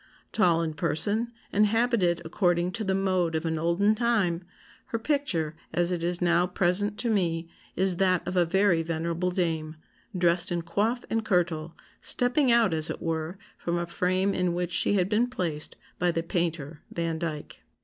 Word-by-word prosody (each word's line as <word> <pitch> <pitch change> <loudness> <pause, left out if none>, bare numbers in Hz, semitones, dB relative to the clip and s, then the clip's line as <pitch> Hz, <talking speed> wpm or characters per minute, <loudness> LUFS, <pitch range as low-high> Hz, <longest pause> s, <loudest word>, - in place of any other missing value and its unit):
Tall 170 -5 +3
in 160 -1 -3
person, 180 +9 -1 0.2
and 210 +1 +4
habited 210 -7 +1
according 175 +1 +1
to 225 +3 -4
the 190 -2 0
'mode' 185 -4 0
of 160 +1 -2
an 160 -1 -1
olden 170 +6 +2
time, 210 -7 0 0.4
her 230 - -2
picture, 225 - 0 0.2
as 175 +1 +3
it 175 -2 -1
is 175 +1 0
now 175 +1 +3
present 190 +4 +1
to 235 - 0
me, 170 -5 0 0.3
is 185 -1 +1
that 185 -1 +1
of 185 - -3
a 180 - +4
very 180 0 +2
venerable 165 +2 -2
dame, 165 -4 -2 0.4
dressed 175 +1 +2
in 170 -1 -1
coif 215 +8 -1
and 225 0 0
kirtle, 170 -5 0 0.3
stepping 250 +2 +3
out, 230 -6 +4
as 160 -1 -1
it - - -4
were, 165 +2 -3 0.2
from 175 0 -2
a 175 - -2
frame 185 +3 0
in 180 -1 0
which 180 0 -2
she - - +4
had 185 -2 +2
been 220 +4 +2
placed 170 -11 -3 0.2
by 180 - +2
the 165 -1 -1
painter 165 -3 -3
Vandyke." 165 -2 -4
175 Hz, 175 wpm, -27 LUFS, 165-200 Hz, 0.4 s, and